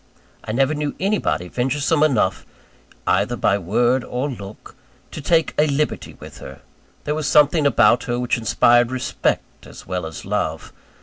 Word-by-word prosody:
I -, -, -5 dB
never 135 Hz, +5 st, +1 dB
knew 150 Hz, -1 st, -3 dB
anybody 195 Hz, -, -1 dB
venturesome 140 Hz, -, 0 dB
enough 125 Hz, -11 st, +2 dB, 0.6 s
either 100 Hz, +6 st, +1 dB
by 100 Hz, -3 st, +1 dB
word 120 Hz, +7 st, +1 dB
or 130 Hz, +4 st, -3 dB
look 100 Hz, -4 st, -10 dB, 0.4 s
to 155 Hz, -, -7 dB
take 160 Hz, +2 st, +1 dB
a 155 Hz, -, +4 dB
liberty 145 Hz, +1 st, -2 dB
with -, -, -11 dB
her. -, -, -11 dB, 0.4 s
There 150 Hz, -, -1 dB
was 155 Hz, -1 st, -2 dB
something 150 Hz, 0 st, +4 dB
about 120 Hz, -2 st, +3 dB
her 120 Hz, 0 st, -2 dB
which 125 Hz, -1 st, 0 dB
inspired 120 Hz, +1 st, +3 dB
respect 130 Hz, -1 st, -3 dB
as -, -, -13 dB
well 90 Hz, -2 st, -3 dB
as 80 Hz, -, -9 dB
love. -, -, -3 dB
125 Hz, 160 wpm, -21 LUFS, 110-150 Hz, 0.6 s, a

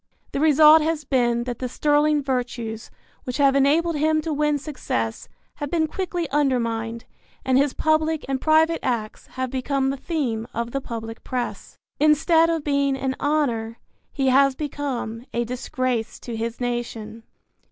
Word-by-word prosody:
The -, -, -2 dB
result 310 Hz, +1 st, +7 dB
has 315 Hz, 0 st, -1 dB
been 240 Hz, -3 st, +1 dB
that 240 Hz, -1 st, -5 dB
the 255 Hz, -, -3 dB
sterling 295 Hz, +2 st, +2 dB
virtues 240 Hz, -4 st, -3 dB, 0.3 s
which 250 Hz, -, -4 dB
have 275 Hz, -2 st, +4 dB
enabled 310 Hz, +5 st, +3 dB
him 310 Hz, +1 st, +2 dB
to 315 Hz, 0 st, -3 dB
win 300 Hz, 0 st, +1 dB
success 250 Hz, -, -4 dB, 0.3 s
have 290 Hz, -, -4 dB
been 325 Hz, 0 st, +1 dB
quickly 350 Hz, 0 st, -3 dB
undermined 235 Hz, -5 st, 0 dB, 0.4 s
and 260 Hz, -, +2 dB
his 275 Hz, +1 st, +3 dB
public 315 Hz, 0 st, +1 dB
and 270 Hz, -1 st, -2 dB
private 320 Hz, +1 st, +3 dB
acts 230 Hz, -4 st, -3 dB
have 260 Hz, -1 st, -3 dB
become 270 Hz, +1 st, 0 dB
the 275 Hz, -, -4 dB
theme 255 Hz, -8 st, -2 dB
of 235 Hz, +1 st, -2 dB
the 275 Hz, -, -2 dB
public 225 Hz, -2 st, -7 dB
press. 250 Hz, -2 st, -4 dB, 0.2 s
Instead 320 Hz, +2 st, +4 dB
of 325 Hz, -2 st, -1 dB
being 280 Hz, -2 st, +1 dB
an 265 Hz, 0 st, -2 dB
honor 240 Hz, -7 st, 0 dB, 0.3 s
he 270 Hz, -2 st, +1 dB
has 275 Hz, +1 st, +4 dB
become 265 Hz, -6 st, -4 dB
a 240 Hz, -, +1 dB
disgrace 250 Hz, -1 st, -3 dB
to 235 Hz, -, -6 dB
his 230 Hz, +1 st, -4 dB
nation. 235 Hz, -2 st, -4 dB
270 Hz, 155 wpm, -23 LUFS, 240-300 Hz, 0.4 s, result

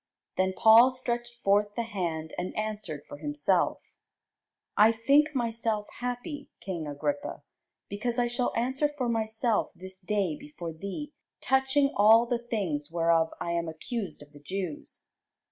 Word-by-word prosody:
Then 190 Hz, 0 st, +1 dB
Paul 225 Hz, +3 st, +8 dB
stretched 240 Hz, -2 st, -3 dB
forth 205 Hz, +1 st, +3 dB
the 235 Hz, -, 0 dB
hand, 170 Hz, -7 st, -3 dB
and 180 Hz, +1 st, -4 dB
answered 210 Hz, -8 st, -3 dB
for 290 Hz, -, -9 dB
himself: 295 Hz, 0 st, +1 dB, 0.9 s
I 215 Hz, +2 st, +7 dB
think 280 Hz, +7 st, +3 dB
myself 230 Hz, -3 st, -1 dB
happy, 250 Hz, +4 st, -4 dB
king 170 Hz, -5 st, -4 dB
Agrippa, 285 Hz, -, -3 dB, 0.4 s
because 235 Hz, +4 st, -3 dB
I 245 Hz, -, +3 dB
shall 240 Hz, +1 st, -1 dB
answer 260 Hz, +5 st, +1 dB
for 255 Hz, -3 st, 0 dB
myself 225 Hz, 0 st, 0 dB
this 185 Hz, +1 st, -8 dB
day 195 Hz, -4 st, 0 dB
before 175 Hz, -, -8 dB
thee 200 Hz, -, -6 dB, 0.3 s
touching 265 Hz, +1 st, +2 dB
all 220 Hz, +3 st, +7 dB
the 240 Hz, 0 st, -1 dB
things 190 Hz, -12 st, -2 dB
whereof 165 Hz, -1 st, +3 dB
I 170 Hz, -, -2 dB
am 170 Hz, 0 st, -1 dB
accused 165 Hz, -, -5 dB
of 145 Hz, -, -19 dB
the 145 Hz, -, -13 dB
Jews. 185 Hz, -3 st, -5 dB
220 Hz, 145 wpm, -28 LUFS, 180-245 Hz, 0.9 s, Paul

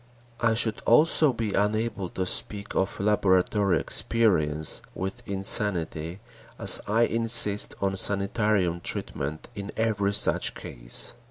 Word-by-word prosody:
I 115 Hz, -1 st, +1 dB
should 110 Hz, -2 st, -1 dB
also 155 Hz, +3 st, +4 dB
be 115 Hz, -4 st, -4 dB
unable 105 Hz, -1 st, -2 dB
to 95 Hz, -, -4 dB
speak 100 Hz, +2 st, -3 dB
of 95 Hz, -, -2 dB
laboratory 100 Hz, -1 st, +1 dB
experience 80 Hz, -10 st, 0 dB
with 95 Hz, +1 st, -6 dB
insanity, 95 Hz, -3 st, -1 dB, 0.4 s
as -, -, +4 dB
I 110 Hz, +3 st, +1 dB
insist 115 Hz, -3 st, +5 dB
on 95 Hz, 0 st, -1 dB
sanitarium 100 Hz, -3 st, -1 dB
treatment 75 Hz, -2 st, -4 dB
in 100 Hz, 0 st, -8 dB
every 100 Hz, -3 st, -1 dB
such -, -, +2 dB
case. -, -, -3 dB
100 Hz, 115 wpm, -25 LUFS, 95-110 Hz, 0.4 s, insist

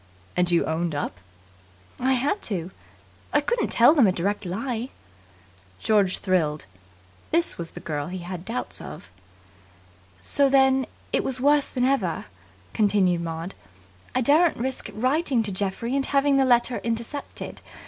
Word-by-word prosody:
"And 180 Hz, 0 st, +2 dB
you 170 Hz, -1 st, +3 dB
owned 160 Hz, 0 st, -1 dB
up?" 120 Hz, -10 st, -4 dB, 0.8 s
"I 260 Hz, +1 st, +2 dB
had 280 Hz, +11 st, 0 dB
to. 180 Hz, -3 st, -3 dB, 0.6 s
I -, -, +4 dB
couldn't 480 Hz, -1 st, 0 dB
tell 240 Hz, +6 st, +6 dB
them 275 Hz, -9 st, +5 dB
a -, -, +4 dB
direct 200 Hz, +3 st, -2 dB
lie." 235 Hz, +6 st, -3 dB, 0.9 s
George 205 Hz, -4 st, +3 dB
thrilled. 160 Hz, -6 st, 0 dB, 0.6 s
This 335 Hz, -, +1 dB
was 170 Hz, -1 st, -4 dB
the -, -, -9 dB
girl 145 Hz, -2 st, -3 dB
he 185 Hz, +1 st, -5 dB
had 175 Hz, +1 st, -8 dB
had 175 Hz, -, -14 dB
doubts 240 Hz, +2 st, -3 dB
of. 75 Hz, +4 st, -10 dB, 1.1 s
"So 275 Hz, -, +2 dB
than 265 Hz, -1 st, +4 dB, 0.3 s
it -, -, +2 dB
was 260 Hz, -1 st, -2 dB
worse 285 Hz, +2 st, +3 dB
then 250 Hz, -1 st, -1 dB
ever," 270 Hz, +1 st, 0 dB, 0.5 s
continued 195 Hz, -5 st, +2 dB
Maud. 165 Hz, +2 st, -5 dB, 0.6 s
"I 255 Hz, -, +3 dB
daren't 305 Hz, +7 st, +4 dB
risk 260 Hz, +2 st, -3 dB
writing 255 Hz, +1 st, +1 dB
to 205 Hz, -, -1 dB
Geoffrey 200 Hz, +6 st, -2 dB
and 275 Hz, -, +1 dB
having 280 Hz, 0 st, +3 dB
the 270 Hz, -, +4 dB
letter 240 Hz, -1 st, +3 dB
intercepted. 230 Hz, +5 st, -4 dB
230 Hz, 150 wpm, -25 LUFS, 180-265 Hz, 1.1 s, tell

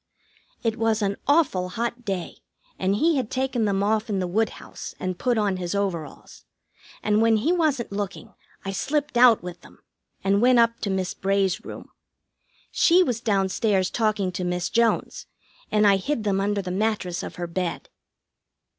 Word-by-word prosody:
It 225 Hz, -1 st, 0 dB
was 225 Hz, -1 st, +1 dB
an 200 Hz, 0 st, 0 dB
awful 280 Hz, -, +2 dB
hot 235 Hz, +4 st, -3 dB
day, 190 Hz, -4 st, -4 dB, 0.4 s
and 190 Hz, +1 st, +1 dB
he 320 Hz, +7 st, +2 dB
had 250 Hz, -5 st, -2 dB
taken 260 Hz, -3 st, -1 dB
them 200 Hz, -1 st, +1 dB
off 215 Hz, +2 st, 0 dB
in 205 Hz, -, 0 dB
the 185 Hz, -, -1 dB
woodhouse 215 Hz, +5 st, -3 dB
and 185 Hz, -1 st, -3 dB
put 245 Hz, -2 st, +1 dB
on 205 Hz, -3 st, +1 dB
his 180 Hz, +1 st, -3 dB
overalls, 175 Hz, -7 st, -4 dB, 0.6 s
and 210 Hz, 0 st, +2 dB
when 225 Hz, -1 st, +4 dB
he 265 Hz, +11 st, +1 dB
wasn't 300 Hz, -, 0 dB
looking 200 Hz, -1 st, -5 dB, 0.3 s
I 195 Hz, -, -2 dB
slipped 290 Hz, +7 st, -2 dB
out 240 Hz, -4 st, +6 dB
with 175 Hz, -1 st, -8 dB
them, -, -, -17 dB, 0.5 s
and 200 Hz, +1 st, +2 dB
went 250 Hz, 0 st, +5 dB
up 230 Hz, 0 st, +3 dB
to 205 Hz, -, -3 dB
Miss 190 Hz, -1 st, -1 dB
Bray's 195 Hz, -1 st, 0 dB
room. -, -, -9 dB, 0.8 s
She 360 Hz, +2 st, +5 dB
was 245 Hz, -7 st, -2 dB
down 195 Hz, -4 st, +1 dB
stairs 190 Hz, -2 st, +1 dB
talking 215 Hz, -4 st, 0 dB
to 180 Hz, 0 st, -4 dB
Miss 180 Hz, 0 st, -2 dB
Jones, 235 Hz, -1 st, 0 dB, 0.4 s
and 210 Hz, 0 st, +3 dB
I 200 Hz, -1 st, +5 dB
hid 235 Hz, +4 st, -2 dB
them 195 Hz, -2 st, +1 dB
under 200 Hz, 0 st, 0 dB
the 180 Hz, -, -4 dB
mattress 195 Hz, -3 st, -1 dB
of -, -, -7 dB
her 175 Hz, -, -4 dB
bed. 175 Hz, 0 st, -3 dB
205 Hz, 175 wpm, -24 LUFS, 190-235 Hz, 0.8 s, out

